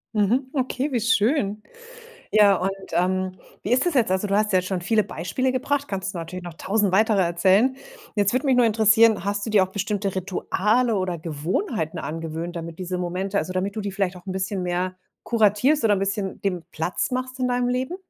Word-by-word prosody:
Mhm, 225 +6 +2
okay, 265 +1 -1
wie 245 - +1
schön. 220 -2 +1 0.7
Ja, 205 -2 +5
und, 185 +2 -1 0.2
ähm, 185 +2 0 0.3
wie - - -4
ist 255 +2 +3
das 350 - +1
jetzt? 245 -9 +2
Also, 190 +2 +1
du 200 - -1
hast 210 +1 +2
ja 185 - +4
jetzt 185 - -7
schon 190 -2 -2
viele 215 +4 +2
Beispiele 255 +11 -2
gebracht, 285 +2 -1
kannst 190 -1 -3
du - - -4
natürlich 175 +2 -6
noch 175 -2 -8
1.000 200 +3 0
weitere 210 +2 +3
erzählen. 190 +9 +3 0.4
Jetzt 205 -1 +2
würde 255 +3 0
mich 265 -2 +3
nur 250 - +5
interessieren, 220 -2 +4
hast 205 0 -1
du 225 - -4
dir 210 -3 +5
auch 185 - 0
bestimmte 200 0 -2
Rituale 210 +5 0
oder 185 -2 -2
Gewohnheiten 160 - -3
angewöhnt, 165 +2 -5
damit 165 -1 -6
diese 185 0 -3
Momente 180 +3 -3
also, 185 - -1
damit 190 +2 -2
du 215 - -2
die 200 -1 -4
vielleicht 190 -2 -1
auch 175 - -13
'n 190 - -3
bisschen 190 0 -2
mehr 180 +1 -2 0.3
kuratierst 230 +6 +2
oder 215 - +4
'n - - -1
bisschen 195 0 -2
dem 180 -4 -2
Platz 170 +10 -2
machst 255 0 -3
in 255 - 0
deinem 245 0 0
Leben? 255 +7 -2
200 Hz, 210 wpm, -24 LUFS, 185-230 Hz, 0.7 s, Ja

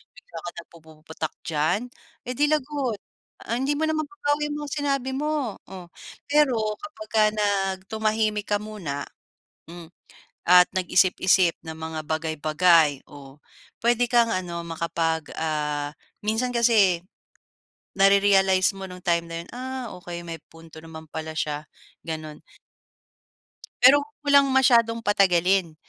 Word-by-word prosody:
bigla 180 -2 -13
ka 175 - -4
nagpupuputak 160 -1 -9
diyan, 160 +6 0 0.5
eh, 250 - -2
di 295 - +4
lagot, 275 -7 -1 0.5
ah, 235 - -2
hindi 270 +3 0
mo 315 - -1
na 315 - 0
mababawi 295 -1 -2
yung 295 - -3
mga 285 - -9
sinabi 275 -3 -1
mo, 295 -6 -2
oh. 185 -2 -9 0.4
Pero 290 -4 +3 0.3
kapagka 220 -8 -1
nag 195 -2 0
tumahimik 215 -1 0
ka 205 - +2
muna, 170 -10 -5 0.6
m 170 -1 -10 0.6
at 180 0 +7
nag-isip-isip 185 -1 +3
ng 160 - -6
mga 160 0 -5
bagay-bagay 155 -1 +2
o 140 0 -13 0.4
puwede 240 +1 +3
kang 235 -1 +4
ano 175 -2 -3
makapag 165 -1 -2
ah, 150 -2 -2 0.3
minsan 230 +4 0
kasi 210 -7 +4 1.0
nare-realize 195 -1 +4
mo 190 - -6
nung 180 0 -10
time 170 -1 +1
na 165 - -7
'yun, 170 - -15
"Ah 260 +1 -5 0.2
okey 175 -1 -7
may 165 -1 -5
punto 165 -1 -15
naman 160 -1 -10
pala 160 0 -6
siya." 150 0 -3 0.4
Gano'n. 155 -2 -6 1.4
Pero 275 +3 +8
'wag - - -16 0.2
mo - - -11
lang 280 -1 +6
masyadong 235 -3 +4
patagalin 185 -4 +2
190 Hz, 130 wpm, -24 LUFS, 165-235 Hz, 1.4 s, Pero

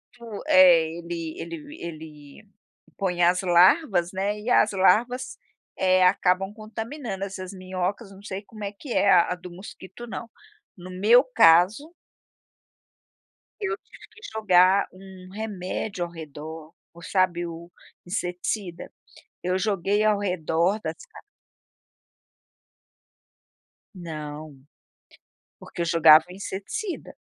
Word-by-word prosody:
fu 230 -4 -9
é, 175 -3 +6
ele 170 -2 -6
ele 165 -2 -8
ele 155 +2 -10 0.5
põe 180 -3 -1
as 180 +2 +3
larvas, 180 - +4
né, 200 +2 -2
e 225 +4 -5
as 215 - +4
larvas, 220 +7 +1 0.4
eh, 185 -1 +3
acabam 185 +1 +2
contaminando 225 0 -6
essas 190 -1 -7
minhocas, 185 +2 -4
não 195 0 -14
sei 195 0 -6
como 215 0 -11
é 200 - -3
que 235 +5 -8
é 200 - +3
a 180 0 +4
do 180 0 -11
mosquito 190 +4 -11
não. 230 0 -7 0.5
No 180 +1 -10
meu 210 +7 +5
caso 220 - +4 1.7
eu 405 +2 -1
tive - - -17
que - - -18
jogar 190 -2 +4
um 185 -1 -13
remédio 195 -2 -4
ao 170 - -11
redor, 160 0 -9 0.2
o, 170 - -15
sabe, 175 -1 0
o 170 +1 -9 0.3
inseticida? 180 0 -4 0.5
Eu 180 +1 0
joguei 200 +1 0
ao 215 -1 +2
redor 180 0 0
das - - -6
ca 450 - -15 2.8
Não. 155 -4 -8 1.0
Porque - - -10
eu - - 0
jogava 160 -2 +6
inseticida. 200 - -6
185 Hz, 115 wpm, -25 LUFS, 170-210 Hz, 2.8 s, é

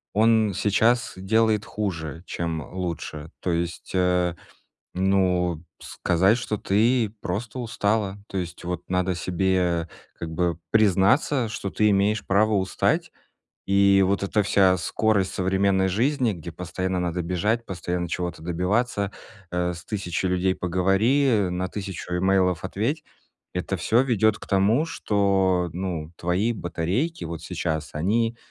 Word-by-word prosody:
он 110 -1 +4
сейчас 110 +6 +2
делает 110 +2 +2
хуже, 80 -6 -4
чем 80 -2 -3
лучше. 85 -4 -5
То 90 - -1
есть, 85 -1 -3
э, 90 -1 +2 0.6
ну, 90 -3 +1 0.2
сказать, 95 +6 +1
что 110 -3 -3
ты 110 +3 +2
просто 105 +7 -4
устала, 105 -3 -1
то 95 - -5
есть 90 -1 -5
вот 90 0 -5
надо 90 0 0
себе 90 -2 0 0.3
как 85 - -4
бы 85 0 -1
признаться, 110 - +3
что 100 -3 -4
ты 105 0 +3
имеешь 100 +2 +2
право 105 +3 +3
устать. 95 -2 0 0.6
И 100 0 +5
вот 100 +1 0
эта 105 +1 +1
вся 95 -2 +4
скорость 100 +1 +1
современной 95 0 +2
жизни, 120 +5 +1
где 85 -2 -8
постоянно 90 +2 -3
надо 90 0 -1
бежать, 105 +7 0
постоянно 90 -1 -3
чего-то 90 -2 -4
добиваться, 100 +4 0 0.4
э, 90 0 0
с 85 - -11
1000 95 -3 -2
людей 90 +1 +1
поговори, 95 +5 +2
на 90 +1 -2
1000 95 -3 -5
имейлов 95 -2 +2
ответь,- 115 - -2 0.5
это 90 +2 -2
всё 115 +8 +3
ведёт 110 -4 +2
к - - -11
тому, 105 +10 +3
что, 95 - +1
ну, 85 -4 -4
твои 95 +7 0
батарейки 95 - -2
вот 80 0 -5
сейчас, 80 -4 -3
они 115 +9 0
95 Hz, 135 wpm, -24 LUFS, 90-105 Hz, 0.6 s, И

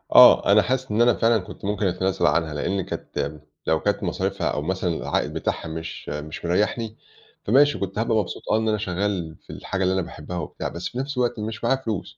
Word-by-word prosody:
آه - - +9
أنا - - +7
حاسس 130 -2 -1
إن 110 +3 +2
أنا 120 -1 +6
فعلًا 115 0 +3
كُنت 95 - -10
ممكن 105 0 0
أتنازل 95 +1 0
عنها 80 -3 +1
لإني 95 +6 -1
كانت، 75 -3 -4 0.3
لو 80 -1 +3
كانت 105 0 0
مصاريفها 95 +2 -1
أو - - -1
مثلًا 90 +3 -1
العائد - - -1
بتاعها - - -2
مش 80 0 -6
مش 75 +3 -6
مريّحني، 105 +5 0 0.5
فماشي 145 +6 +4
كنت 100 +2 -3
هابقى 115 -1 +2
مبسوط 105 - -2
آه 110 - +4
إن 110 0 0
أنا 105 - +2
شغّال 95 -4 -2
في - - -37
الحاجة 95 -1 -3
اللي 95 +1 +2
أنا 95 - +1
باحبها 85 +1 -7
وبتاع 75 - -4
بس 85 +1 -4
في - - -9
نفْس 135 +1 -3
الوقت 120 -2 0
مش 110 +2 -5
معايا 130 +3 +2
فلوس 110 -5 -4
100 Hz, 210 wpm, -24 LUFS, 85-110 Hz, 0.5 s, آه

